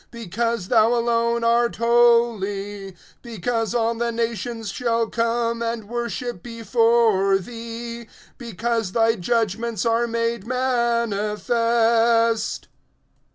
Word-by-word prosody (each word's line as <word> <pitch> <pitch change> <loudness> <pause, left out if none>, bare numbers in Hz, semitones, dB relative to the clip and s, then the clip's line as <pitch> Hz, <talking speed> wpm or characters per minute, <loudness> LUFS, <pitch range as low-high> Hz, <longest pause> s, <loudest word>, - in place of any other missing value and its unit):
Because 230 -2 -3
thou 230 0 +4
alone 235 0 +1
art 235 +1 +2
holy; 215 -5 +1 0.3
because 230 0 -3
all 230 -1 +1
the 235 0 -2
nations 230 -1 -3
shall 230 -1 0
come 230 0 -1
and 230 -1 -2
worship 240 -2 -4
before 230 -3 +2
thee; 230 +2 -7 0.3
because 230 -3 -3
thy 225 -1 +3
judgments 225 +1 -1
are 230 +1 +2
made 230 -2 -2
manifest. 230 -1 +1
230 Hz, 95 wpm, -22 LUFS, 225-235 Hz, 0.3 s, thou